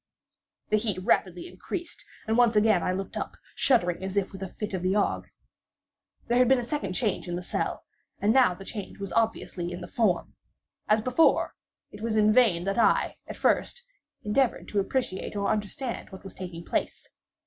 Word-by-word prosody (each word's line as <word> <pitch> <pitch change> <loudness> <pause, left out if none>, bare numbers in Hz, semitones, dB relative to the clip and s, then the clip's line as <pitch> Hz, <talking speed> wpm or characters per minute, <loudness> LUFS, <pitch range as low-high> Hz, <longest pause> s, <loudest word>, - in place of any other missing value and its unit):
The 215 - +4
heat 210 -3 0
rapidly 185 -5 +1
increased, 340 - -6 0.2
and 220 - +1
once 240 -2 +4
again 210 -3 +4
I - - 0
looked 190 +1 -4
up, - - -4 0.2
shuddering 185 -9 +2
as 190 0 -4
with 195 -1 -1
a 190 - -4
fit 210 +2 -6
of 185 - -2
the 185 +2 +1
ague. 210 - 0 1.0
There 240 +1 +3
had 250 - +5
been 265 +2 +5
a 245 - -2
second 235 -7 -3
change 205 -2 -1
in 175 - -2
the 180 - -4
cell—and 205 +3 -3
now 250 -9 +5
the 195 - -11
change 205 -3 -6
was 200 -1 -6
obviously 220 -6 -1
in 175 - -5
the 175 - -7
form. 210 -8 0 0.5
As 215 +1 +4
before, 255 +8 +3 0.4
it 210 - -11
was 225 -1 -1
in 215 0 +5
vain 215 -9 +4
that 195 +4 -1
I, - - +3
at - - -7
first, 485 - +1 0.4
endeavoured 235 +4 +1
to 205 - 0
appreciate 200 -2 -2
or 200 -1 0
understand 215 +4 -3
what 190 - -11
was 195 - -9
taking 175 -2 -8
place. - - -2
210 Hz, 185 wpm, -27 LUFS, 185-230 Hz, 1.0 s, had